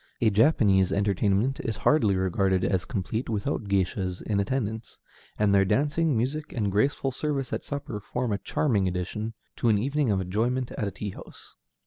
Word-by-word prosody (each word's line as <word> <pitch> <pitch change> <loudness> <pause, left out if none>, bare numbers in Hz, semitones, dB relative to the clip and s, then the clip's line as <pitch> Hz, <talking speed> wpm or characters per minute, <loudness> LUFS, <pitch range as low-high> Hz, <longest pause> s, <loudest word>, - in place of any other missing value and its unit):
A 110 -2 +3
Japanese 100 - +4
entertainment 100 +5 +1
is 110 -3 -3
hardly 110 -11 +3
regarded 95 0 +1
as 95 -2 0
complete 110 +3 -3
without 110 +2 -2
géishas 95 -1 -1
in 105 -2 0
attendance, 110 +1 -2 0.4
and 105 -1 +3
their 100 -1 +5
dancing, 145 - +1
music, 145 +6 -2
and 105 -5 -1
graceful 135 +6 +1
service 135 -1 -2
at - - -2
supper 140 -6 -5
form 115 +2 -2
a 100 - -1
charming 105 -9 +1
addition 95 +5 -3 0.2
to 120 - +2
an 105 - +4
evening 140 +4 0
of 100 -2 +2
enjoyment 115 +7 -1
at 105 - -3
a - - -3
tea 105 0 -5
house. - - -12
105 Hz, 170 wpm, -27 LUFS, 100-130 Hz, 0.4 s, their